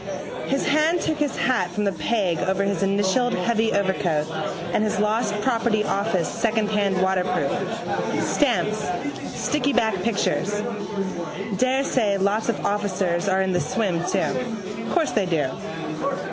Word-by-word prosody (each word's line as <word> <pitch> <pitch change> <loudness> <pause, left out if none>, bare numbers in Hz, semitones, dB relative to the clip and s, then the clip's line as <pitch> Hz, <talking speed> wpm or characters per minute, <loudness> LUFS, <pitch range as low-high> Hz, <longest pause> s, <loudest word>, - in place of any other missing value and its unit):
His 275 +1 0
hand 310 +4 +3
took 315 - 0
his 295 -2 0
hat 235 -8 +1
from 210 +4 -2
the 200 - +2
peg 180 0 0
over 190 +1 +1
his 200 0 0
initialled 200 +5 +2
heavy 225 +4 +1
overcoat 185 -6 +1 0.5
and - - +2
his 215 -2 0
lost 210 0 +1
property 230 -3 +2
office 200 -5 0
secondhand 210 -4 +1
waterproof. 185 -1 +1 0.7
Stamps: - - +1 0.6
stickyback 245 -9 +1
pictures. 205 -3 0 1.1
Daresay 255 -5 +2
lots 205 +4 +1
of 235 - -1
officers 195 -3 0
are 190 0 +3
in 190 -1 0
the 180 - +2
swim 190 -7 0
too. 190 - -2
Course 335 -4 +2
they 200 -4 +1
do. 150 -7 +1
205 Hz, 130 wpm, -24 LUFS, 185-230 Hz, 1.1 s, hand